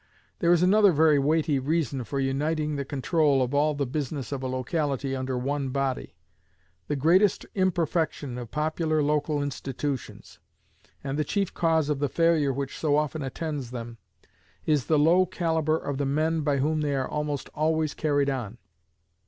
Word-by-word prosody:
There 170 -1 +3
is 175 0 +4
another 200 +2 +5
very 155 -2 +4
weighty 150 0 +2
reason 140 -2 -1
for 140 +5 -3
uniting 150 +3 -1
the 140 - -2
control 140 0 +1
of 125 +2 -3
all 150 +1 +2
the 140 0 -1
business 140 +1 -4
of 140 -2 -3
a 130 - -2
locality 135 +1 -2
under 130 -1 -2
one 135 +2 -2
body. 135 -1 -2 0.7
The 145 - -1
greatest 175 +8 +3
imperfection 165 -8 -1
of 120 -2 -7
popular 155 +1 0
local 150 0 0
institutions, 140 -1 -5 0.6
and 140 +2 -3
the - - +2
chief 195 +5 -1
cause 160 -3 +2
of 150 -2 -1
the 145 -1 0
failure 165 -3 +2
which 135 0 -4
so 150 -2 +2
often 150 +1 -1
attends 140 -1 -4
them, 120 -2 -7 0.7
is 150 -5 +1
the 155 - +3
low 170 +5 +4
calibre 160 -3 0
of 145 -3 -4
the 140 - 0
men 155 +3 +1
by 145 -1 +1
whom 155 +3 0
they 145 -2 0
are 135 -1 -1
almost 150 -2 -3
always 155 0 0
carried 145 -2 +1
on. 120 -5 -3
145 Hz, 170 wpm, -26 LUFS, 135-160 Hz, 0.7 s, another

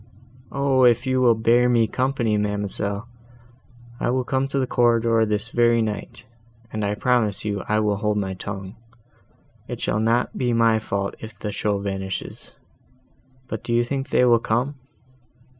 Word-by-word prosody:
"O! 140 -2 +2
if 120 +1 +4
you 130 0 +1
will 120 -2 +5
bear 120 +2 +3
me 120 -2 +4
company, 125 -2 0
ma'amselle, 105 +1 -2 0.9
I - - 0
will 130 +1 +1
come 135 +1 0
to 140 - -3
the 135 - +1
corridor, 115 -2 +2
this 105 +2 -1
very 120 -1 +3
night, 105 0 -5 0.5
and 110 -1 -2
I 100 0 0
promise 110 -4 +1
you 100 -2 -2
I 105 0 +2
will 105 -1 +1
hold 105 0 0
my 95 -2 -2
tongue; 95 +1 -7 0.9
it - - -6
shall 105 - -1
not 115 +3 +1
be 125 -2 0
my 115 -1 +3
fault 100 -2 -3
if 110 -2 -10
the 105 +1 -4
show 105 0 -1
vanishes.—But 125 +6 -8
do 120 - -2
you 120 - +3
think 135 +3 -3
they 125 - +3
will 120 -1 +5
come?" 120 +6 -1
115 Hz, 160 wpm, -23 LUFS, 105-125 Hz, 0.9 s, will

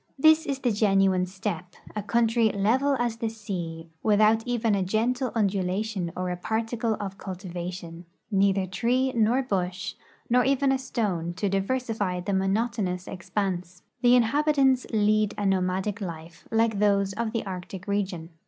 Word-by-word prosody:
This 315 +3 +5
is 275 - -1
the 250 -3 0
genuine 195 -3 +3
steppe, 185 -1 -5 0.2
a 210 - -1
country 230 +1 +2
level 245 +8 +2
as 240 -2 -1
the 230 -1 -2
sea, 175 -7 -6
without 215 +1 +4
even 235 -3 +1
a 200 - +1
gentle 235 +7 0
undulation 195 -2 0
or 180 0 -2
a - - -1
particle 225 +4 -1
of 195 -1 -5
cultivation 180 -2 -6
— - - -50
neither 195 -1 +3
tree 250 +7 0
nor 235 +4 +2
bush, 185 -5 -2 0.3
nor 250 +1 +4
even 275 +1 +2
a 265 - +1
stone, 195 -10 -2
to 200 +2 -1
diversify 205 -2 -1
the 180 +3 -2
monotonous 195 -1 0
expanse. 185 -1 -3 0.2
The 245 -1 +6
inhabitants 265 +1 +3
lead 215 -1 +2
a 205 - -2
nomadic 190 +2 0
life, 165 -2 -8
like 225 -2 +2
those 200 -1 +2
of 225 +2 -2
the 230 -2 -2
Arctic 185 0 -7
region. 190 -5 -2
205 Hz, 155 wpm, -26 LUFS, 185-230 Hz, 0.3 s, The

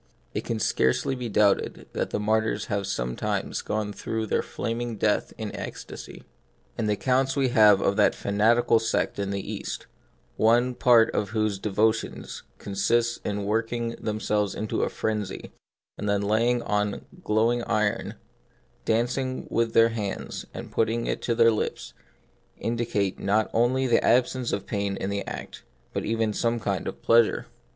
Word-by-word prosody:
It - - -3
can 115 - -2
scarcely 65 - +1
be 125 -2 -4
doubted 105 -1 +2
that - - -2
mar 110 +1 +2
tyrs 110 - -2
have 100 -2 -1
sometimes - - -2
gone 105 -1 -2
through 110 +1 -3
their - - +1
flam 115 +1 -4
ing 120 -1 -3
death 105 0 +1
in - - -5
ecstasy. - - -8 0.5
And 110 - -1
the - - +3
accounts 130 +4 +1
we 135 -2 +2
have 105 -4 +6
of 100 - +1
that 105 - +4
fanatical 115 +3 +3
sect 115 -2 -1
in 100 -1 -1
the 100 -1 -3
East, - - -5 0.5
one 120 +3 +4
part 120 -2 +5
of 105 - -1
whose 110 -2 0
devotions 110 +2 -1 0.2
consists 115 +4 0
in 105 -1 -2
working 115 +2 -1
themselves 105 -1 -1
first - - -7
into 110 - -1
a - - +1
frenzy, 105 -3 -3 0.5
and 105 - -2
then 100 0 +1
laying 115 +4 +2
hold - - -7
on 105 0 0 0.2
glowing 115 +3 +2
iron, 105 -1 0 0.7
dancing 125 +3 0
with 115 0 +2
it - - -11
in - - -16
their 115 0 +6
hands, 105 -4 -4
and - - -8
putting 115 +1 0
it - - -2
to 115 - 0
their 115 0 +6
lips, 110 - -3 0.6
indicate 115 -4 -1
not 105 +2 +1
only 125 +3 +2
an 120 - +3
absence 125 +1 +2
of - - -2
pain 100 -1 -2
in 95 - -3
the 100 0 -2
act, - - -7 0.3
but - - -2
even 110 -1 0
some 115 +2 0
kind 105 - -2
of - - -6
pleasure. 115 -1 +4
110 Hz, 170 wpm, -26 LUFS, 105-120 Hz, 0.7 s, have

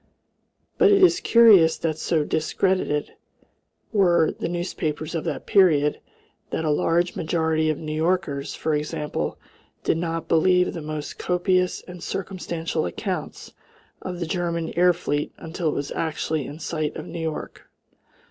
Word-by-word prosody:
But 415 -3 +6
it 395 -1 +5
is 360 -1 +6
curious 205 -9 +6
that 160 -2 -1
so 160 0 0
discredited 160 0 0 0.8
were 175 -6 +4
the - - -4
newspapers 165 -3 -3
of 165 0 -3
that 160 -4 -3
period 155 -7 +4 0.5
that 160 - -2
a 155 - +2
large 170 +4 +1
majority 160 -1 0
of 155 - 0
New 155 -1 -5
Yorkers, 155 -3 -1
for 155 - -1
example, 150 0 -2 0.5
did - - +1
not 165 -1 -3
believe 180 +2 +3
the 165 - -5
most 150 -1 -6
copious 180 0 +1
and 180 -1 -11
circumstantial 175 - -3
accounts 85 - -5 0.5
of 180 -1 -5
the 170 - -2
German 170 -1 -2
air 180 +1 +5
fleet 150 -4 -2
until 165 +1 -4
it - - -2
was 145 - -3
actually 155 -2 -2
in 145 - -8
sight 155 -1 -3
of - - -6
New 170 0 -7
York. 160 -1 -5
165 Hz, 150 wpm, -24 LUFS, 155-180 Hz, 0.8 s, But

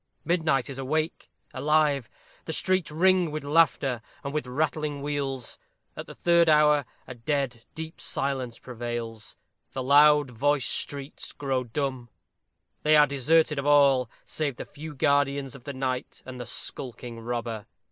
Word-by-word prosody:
Midnight 160 -7 +1
is 135 -1 -6
awake 155 +4 -2 0.2
alive; 150 -4 +2 0.4
the 160 - -3
streets 185 -2 +1
ring 180 +2 +3
with 150 0 -4
laughter 140 -5 +2 0.2
and 140 - -4
with 150 -4 -2
rattling 150 +1 -2
wheels. 140 -4 -3 0.4
At - - -7
the - - -10
third 170 -1 +4
hour, 150 -2 +5 0.2
a 130 - -8
dead, 125 -1 -2
deep 160 0 -7
silence 130 -4 -2
prevails; 120 -2 -6 0.4
the 130 - -3
loud 145 0 +6
voiced 140 +3 +1
streets 140 0 -3
grow 135 -3 -1
dumb. 130 0 -3 0.7
They 155 0 +5
are 150 - +8
deserted 150 +2 +2
of 140 - -3
all, 140 -4 +5 0.2
save 145 -4 -2
the - - -7
few 150 +1 -9
guardians 140 -1 +1
of 130 -3 -12
the 140 - -4
night 130 -1 -3
and 130 -1 -8
the 120 - -7
skulking 120 -1 -6
robber. 115 -2 -4
140 Hz, 145 wpm, -27 LUFS, 125-150 Hz, 0.7 s, are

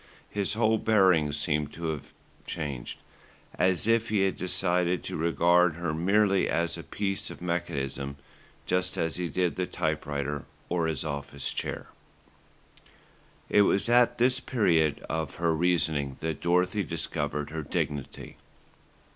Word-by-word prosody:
His 100 0 -1
whole 110 -1 +3
bearing 95 -9 +4
seemed 75 0 -1
to 85 -1 -4
have 75 -3 -5 0.4
changed, 70 -5 -4 0.6
as 90 0 +2
if 115 0 +2
he 105 -2 +2
had 95 -1 +1
decided 90 -2 +1
to - - -5
regard 85 +1 +3
her 85 -2 -2
merely 100 +4 +2
as 85 0 0
a - - -6
piece 95 -1 -3
of - - -9
mechanism, 70 -6 -3 0.5
just 90 0 0
as 80 0 -1
he 90 -2 -2
did 90 -1 0
the 90 -1 -1
typewriter, 75 -3 -2 0.2
or 85 -2 +1
his 80 -2 -2
office 70 -2 -3
chair. - - -4 1.6
It 105 - +5
was 100 +2 +3
at 120 0 +4
this 125 +1 +3
period 85 - +1
of 80 -2 -3
her 85 -1 +1
reasoning 80 -5 +1
that 80 -1 -3
Dorothy 90 +4 +2
discovered 75 -3 -3
her 80 0 -3
dignity. 70 -1 -4
85 Hz, 140 wpm, -28 LUFS, 75-95 Hz, 1.6 s, It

